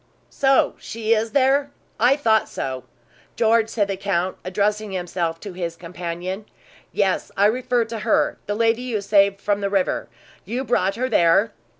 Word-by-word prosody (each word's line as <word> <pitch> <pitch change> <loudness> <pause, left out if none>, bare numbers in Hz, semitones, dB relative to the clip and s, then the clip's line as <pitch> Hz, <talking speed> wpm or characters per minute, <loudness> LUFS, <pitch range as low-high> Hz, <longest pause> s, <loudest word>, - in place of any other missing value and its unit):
"So 270 -1 +3
she 225 0 -1
is 225 0 0
there? 275 +1 +3 0.3
I 245 +4 +5
thought 225 -7 +2
so, 130 -1 -4 0.5
George," 225 -1 +3
said 210 -3 0
the 195 - -2
count, 190 -2 -1
addressing 205 +2 -1
himself 175 -2 -2
to 200 -3 -7
his 170 -2 -4
companion. 180 +3 -6 0.5
"Yes, 195 -2 0
I 200 - +4
refer 245 +1 +1
to 225 0 -6
her, 220 +1 +1
the 205 - -1
lady 225 +2 +2
you 240 -5 -2
saved 200 -1 +3
from 205 0 -1
the 200 - 0
river. 195 -2 0 0.3
You 240 +7 -3
brought 195 -7 +1
her 255 +3 -1
there?" 200 0 +3
205 Hz, 165 wpm, -22 LUFS, 185-230 Hz, 0.5 s, I